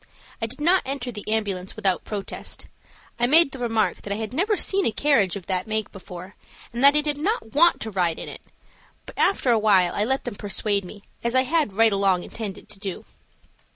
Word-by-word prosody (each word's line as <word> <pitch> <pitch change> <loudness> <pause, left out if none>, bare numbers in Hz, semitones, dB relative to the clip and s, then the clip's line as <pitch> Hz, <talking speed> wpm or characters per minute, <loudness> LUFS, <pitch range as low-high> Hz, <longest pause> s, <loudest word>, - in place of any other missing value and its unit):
I 225 - 0
did 250 +5 -8
not 350 +5 +4
enter 265 -2 -4
the 215 -1 -5
ambulance 200 -4 -2
without 190 -2 0
protest. 205 -2 -5 0.5
I 240 - +3
made 305 +1 +6
the 265 - -8
remark 225 -3 0
that 200 - -7
I - - 0
had 220 +1 -5
never 400 - +1
seen 395 0 +2
a - - +2
carriage 225 -9 +2
of 195 -3 -7
that 185 0 -2
make 215 -1 -2
before, 185 -1 -10 0.4
and 240 +2 -2
that 280 +1 +7
I 300 - +5
did 295 -1 -2
not 350 - -2
want 340 +4 +5
to 220 - -4
ride 175 -4 0
in - - -6
it, - - -8 0.6
but - - -11
after 275 -10 +2
awhile 205 -6 +4
I 205 - 0
let 265 +4 0
them - - -5
persuade 205 0 -1
me, 205 +3 -11 0.2
as 235 +1 -1
I 260 - +5
had 300 -6 0
right 225 +2 +4
along 195 -3 +2
intended 205 -2 -7
to 210 -2 -12
do. 195 -3 -6
220 Hz, 215 wpm, -24 LUFS, 195-270 Hz, 0.6 s, that